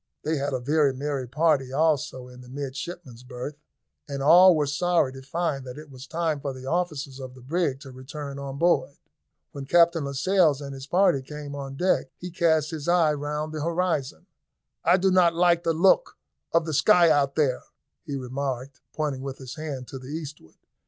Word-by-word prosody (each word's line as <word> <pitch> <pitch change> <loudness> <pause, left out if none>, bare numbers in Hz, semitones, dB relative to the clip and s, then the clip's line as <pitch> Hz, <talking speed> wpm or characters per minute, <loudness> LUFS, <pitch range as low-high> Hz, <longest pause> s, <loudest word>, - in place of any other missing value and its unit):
They 155 +1 0
had 140 +1 -2
a 130 - -1
very 140 +1 +2
merry 140 -1 -3
party 140 -1 +1
also 145 -3 0
in 125 0 -13
the 125 - -14
midshipmen's 135 -1 -7
berth, 125 +3 -7 0.5
and 140 -1 -3
all 175 +4 +8
were 150 -1 +1
sorry 145 -1 +1
to 135 - -9
find 150 0 -2
that 125 - -8
it 150 -1 -11
was 130 +1 -11
time 160 -2 -1
for 140 -1 -4
the 130 0 -10
officers 150 -3 -2
of 130 -1 -8
the 130 - -14
brig 145 -1 -1
to 135 - -10
return 140 +2 -8
on 140 0 -6
board. 170 -3 +2 0.6
When 140 -1 -8
Captain 170 -1 +4
Lascelles 150 +2 +2
and 140 -1 -7
his 135 0 -9
party 175 -4 +3
came 145 +1 -8
on 135 -1 -6
deck 180 -2 +1
he 180 0 -7
cast 160 -2 +2
his 155 -2 -6
eye 170 -3 +4
round 150 +1 -4
the 155 -1 -3
horizon. 170 -3 -1 0.6
"I 175 +2 +5
do 190 +1 +2
not 175 -2 +4
like 170 -1 +3
the 165 - +2
look 190 - +3 0.3
of 165 -1 +2
the 160 - -3
sky 175 +1 +5
out 140 -1 +2
there," 140 -5 +1 0.4
he 145 -4 -5
remarked, 130 0 -4
pointing 145 -4 -2
with 135 0 -6
his 130 -2 -9
hand 145 -5 -6
to 135 - -7
the 130 - -11
eastward. 150 - -8
145 Hz, 195 wpm, -25 LUFS, 135-165 Hz, 0.6 s, all